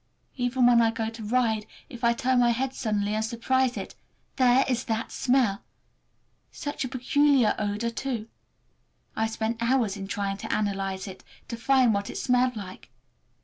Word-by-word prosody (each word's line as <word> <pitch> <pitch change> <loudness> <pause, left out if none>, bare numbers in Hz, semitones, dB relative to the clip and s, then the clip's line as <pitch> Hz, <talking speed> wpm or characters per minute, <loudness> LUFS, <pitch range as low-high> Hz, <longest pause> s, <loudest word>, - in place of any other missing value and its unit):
Even 245 0 +1
when 240 -1 +6
I 225 - +4
go 225 0 -3
to 225 -1 -9
ride, 220 -1 0 0.2
if 245 -5 -11
I 235 0 +4
turn 255 +1 +1
my 240 -1 +4
head 255 +3 -1
suddenly 210 -4 -1
and 215 0 0
surprise 250 +3 0
it—there 255 +1 0
is 250 -1 -1
that 225 -1 -2
smell! 245 -6 +1 0.9
Such 290 -1 -4
a - - -2
peculiar 265 -2 +3
odor, 210 +3 -1
too! 235 -2 -4 0.9
I 220 - +1
have 220 - -3
spent 225 +1 -2
hours 235 -4 +1
in 195 -1 -6
trying 195 0 -2
to - - -6
analyze 195 -2 -2
it, 190 -1 -10 0.3
to 235 - -3
find 250 0 +3
what 200 0 -2
it - - -6
smelled 250 0 +2
like. 190 -3 -9
235 Hz, 170 wpm, -26 LUFS, 215-255 Hz, 0.9 s, when